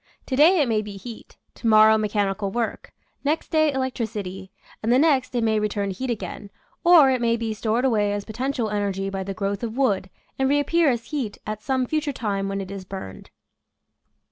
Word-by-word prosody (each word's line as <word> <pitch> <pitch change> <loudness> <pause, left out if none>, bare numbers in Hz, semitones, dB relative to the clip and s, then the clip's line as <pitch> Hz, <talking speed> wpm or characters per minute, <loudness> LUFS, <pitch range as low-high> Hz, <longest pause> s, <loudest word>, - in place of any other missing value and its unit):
To 260 - -2
day 325 +6 +6
it 285 - +3
may 220 -2 +1
be 205 -1 -8
heat, 230 +2 -11 0.2
to - - -5
morrow 215 0 +7
mechanical 205 -2 0
work, 230 +2 -3 0.3
next 300 +3 -1
day 310 -1 +3
electricity, 215 -8 -4 0.3
and 225 - 0
the 250 - +5
next 270 -4 +2
it 240 - +1
may 220 -1 +2
return 205 -1 -1
to 190 - -4
heat 260 +4 -4
again, 215 -2 -5 0.3
or 335 -6 +7
it 255 -2 0
may 230 0 +2
be 225 -1 -2
stored 225 +3 0
away 210 -5 +2
as 205 0 -3
potential 235 0 -2
energy 195 -2 -2
by 195 -1 -3
the 195 0 -5
growth 200 +1 -2
of 235 0 -4
wood 200 -8 +1 0.3
and 265 0 +2
reappear 290 +3 +3
as 235 -3 -1
heat 260 -9 -3
at 215 0 -5
some 260 +1 0
future 305 +2 -1
time 200 -5 -2
when 195 0 -2
it 190 0 -7
is 195 -1 -6
burned. 185 - -9
220 Hz, 200 wpm, -24 LUFS, 200-260 Hz, 0.3 s, morrow